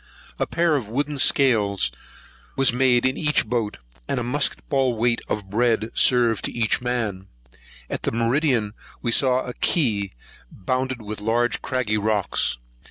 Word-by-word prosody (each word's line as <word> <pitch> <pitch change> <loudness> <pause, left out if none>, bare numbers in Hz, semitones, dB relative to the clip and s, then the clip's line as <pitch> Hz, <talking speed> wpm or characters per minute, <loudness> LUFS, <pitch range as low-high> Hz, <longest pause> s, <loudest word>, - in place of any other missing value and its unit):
A - - 0
pair 170 -2 +1
of 120 -7 -3
wooden 145 +4 -2
scales 110 - +3 0.7
was 135 -3 +3
made 125 -1 +3
in 130 +1 +1
each 150 -1 +1
boat, 115 -4 -2 0.3
and 135 - 0
a - - -2
musket 140 +4 0
ball 130 -4 +1
weight 115 +1 +1
of 100 -2 -4
bread 115 0 +1
served 120 -4 +3
to - - -2
each 115 -1 0
man. 115 -6 -2 0.6
At - - -3
meridian 115 -2 +1 0.3
we 120 - 0
saw 130 +1 +3
a 125 - -6
key, 105 - 0 0.4
bounded 130 +4 -3
with 105 0 -6
large 120 +3 0
craggy 115 -5 -1
rocks. 105 - 0
120 Hz, 150 wpm, -23 LUFS, 110-130 Hz, 0.7 s, scales